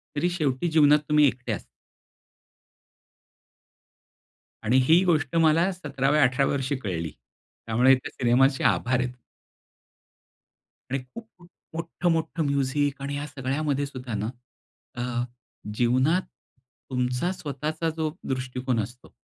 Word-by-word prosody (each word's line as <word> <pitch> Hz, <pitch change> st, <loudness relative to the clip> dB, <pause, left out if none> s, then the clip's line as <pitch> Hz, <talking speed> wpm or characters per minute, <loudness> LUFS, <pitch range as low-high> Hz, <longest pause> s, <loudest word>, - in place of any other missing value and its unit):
तरी 150 Hz, +4 st, +1 dB
शेवटी 155 Hz, -3 st, -1 dB
जीवनात 150 Hz, -1 st, +6 dB
तुम्ही 150 Hz, 0 st, +5 dB
एकटे 125 Hz, -1 st, -3 dB
असता. -, -, -4 dB, 3.0 s
आणि 120 Hz, +4 st, +4 dB
ही 170 Hz, +3 st, +6 dB
गोष्ट 155 Hz, -4 st, +1 dB
मला 165 Hz, +3 st, +4 dB
17व्या 150 Hz, -4 st, 0 dB
18व्या 130 Hz, +2 st, +2 dB
वर्षी 135 Hz, 0 st, -1 dB
कळली, 85 Hz, -9 st, -3 dB, 0.5 s
त्यामुळे 120 Hz, +4 st, +5 dB
त्या 130 Hz, -, -7 dB
सिनेमाचे 130 Hz, +2 st, +3 dB
आभार 125 Hz, +1 st, +2 dB
आहेत. 125 Hz, 0 st, -1 dB, 1.8 s
आणि 135 Hz, -, 0 dB
खूप-खूप 180 Hz, -, -13 dB, 0.3 s
मोठं-मोठं 165 Hz, 0 st, -1 dB
म्युझिक 140 Hz, 0 st, 0 dB
आणि 140 Hz, +1 st, -3 dB
या 145 Hz, -, -4 dB
सगळ्यामध्ये 140 Hz, +1 st, -1 dB
सुद्धा 130 Hz, -3 st, -7 dB
ना 110 Hz, -, -2 dB, 0.7 s
अ, 120 Hz, 0 st, -2 dB, 0.5 s
जीवनात 130 Hz, +10 st, +3 dB, 0.7 s
तुमचा 125 Hz, +6 st, 0 dB
स्वतःचा 155 Hz, 0 st, -3 dB
जो 155 Hz, -1 st, -1 dB, 0.2 s
दृष्टिकोन 130 Hz, -1 st, -2 dB
असतो. 120 Hz, +4 st, -11 dB
140 Hz, 110 wpm, -26 LUFS, 125-155 Hz, 3.0 s, जीवनात